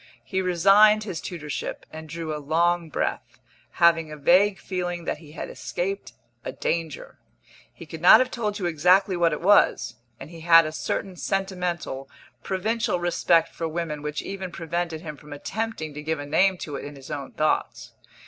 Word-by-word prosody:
He 190 -2 -2
resigned 195 +4 +5
his 190 -6 -5
tutorship, 150 -5 -5
and 160 0 -9
drew 160 -1 -4
a 150 - -6
long 170 +2 +1
breath, - - -3 0.3
having 165 -2 +3
a 150 - -7
vague 190 +7 +4
feeling 175 -2 -4
that - - -3
he 150 -2 -14
had - - -6
escaped 195 +3 -4 0.3
a - - -4
danger. 165 -3 -4 0.5
He - - -12
could 160 0 -9
not 180 +5 +9
have 255 0 0
told 210 -3 -2
you 190 - -3
exactly 180 +4 +3
what 170 -1 +2
it - - -3
was, 170 - +3 0.2
and 140 +4 -10
he 165 - -10
had 165 0 +6
a 155 - -3
certain 180 +5 -3
sentimental, 180 -9 -3 0.3
provincial 195 - -1
respect 170 -1 +2
for 165 - -3
women 160 -2 -4
which 150 0 -4
even 190 -2 -6
prevented 170 -1 -3
him 150 -4 -8
from 150 0 -11
attempting 195 0 -4
to 150 - -7
give 160 +1 -2
a 145 - -5
name 185 +6 +2
to 145 -5 -6
it - - -8
in 145 0 -8
his 135 +1 -11
own 140 -2 -6
thoughts. 155 0 -1
170 Hz, 180 wpm, -25 LUFS, 155-190 Hz, 0.5 s, not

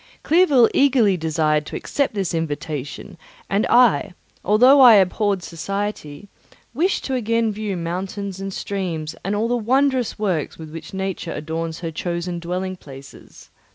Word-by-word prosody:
Clerval 300 -8 +5
eagerly 250 -8 +3
desired 155 -2 0
to - - -7
accept 280 -6 -2
this 195 -4 -2
invitation, 150 -3 -5 0.3
and 200 +2 +1
I, 240 -6 +4 0.3
although 250 +8 +6
I 240 -4 +9
abhorred 195 0 +2
society, 195 -1 -5 0.5
wished 345 +10 0
to 260 -2 -2
view 230 +1 +1 0.3
again 175 -2 -4
mountains 190 +3 -4
and 195 0 -5
streams 175 -6 -4
and 195 +2 -1
all 215 +3 0
the 245 - 0
wondrous 260 +1 +1
works 185 -8 -2
with 160 -1 -10
which 165 0 -9
Nature 190 -3 -4
adorns 160 +2 -5
her 165 -2 -4
chosen 170 +1 -4
dwelling 185 +2 -4
places. 135 -3 -14
190 Hz, 145 wpm, -21 LUFS, 165-230 Hz, 0.5 s, I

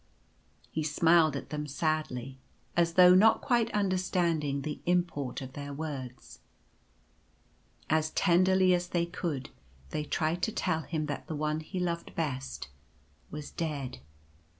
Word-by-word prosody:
He 160 - -2
smiled 155 0 +4
at 140 - -6
them 150 0 -3
sadly,' 140 -4 -2 0.4
as 170 -1 +2
though 180 0 +8
not 220 +4 +6
quite 235 -2 +1
understanding 175 -7 0
the 150 -1 -4
import 170 -8 0
of 130 0 -9
their 145 0 -6
words. 135 -5 -7 1.5
As 155 0 +2
tenderly 185 +2 +4
as 175 0 0
they 175 -1 0
could 165 -6 -4 0.4
they 150 - -2
tried 160 +3 -1
to 220 - 0
tell 160 -6 0
him 155 -1 -3
that 145 -1 -5
the 160 - -4
One 155 +1 -1
he 170 +4 -5
loved 170 -1 -3
best 135 - -3 0.6
was 150 -1 -7
dead. 145 - -4
155 Hz, 135 wpm, -30 LUFS, 145-175 Hz, 1.5 s, though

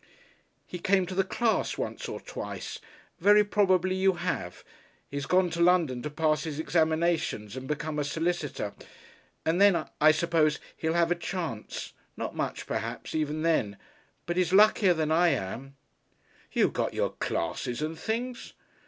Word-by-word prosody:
"He 180 - -7
came 190 +1 +2
to 185 - -6
the 195 +1 +2
class 220 +4 0
once - - -4
or - - -5
twice. - - -6 0.4
Very 210 +1 +6
probably 185 -3 +2
you 190 0 +3
have. 175 - -4 0.5
He's 140 0 -4
gone 180 -1 +3
to 170 - -2
London 170 -8 +3
to 150 - -4
pass 155 0 +1
his 155 -3 -4
examinations 160 - 0
and 130 0 -6
become 150 +1 -2
a - - +1
solicitor. 150 -7 -2 0.7
And 165 +4 +2
then, 185 -6 +5 0.2
I 155 +1 +8
suppose, 155 -1 +2 0.2
he'll 160 0 -1
have 170 0 +3
a - - +6
chance. 170 - -5 0.2
Not - - -4
much, - - -3
perhaps, - - -4
even 155 0 -1
then. 120 -12 +1 0.5
But 175 +1 -2
he's 180 -2 +2
luckier 200 -2 +5
than 155 -1 0
I 170 +2 +4
am." 135 - -2 0.8
"You - - +3
got - - -2
your - - 0
classes 120 +9 -3
and 155 +1 -3
things." 235 +7 -4
165 Hz, 155 wpm, -28 LUFS, 150-185 Hz, 0.8 s, I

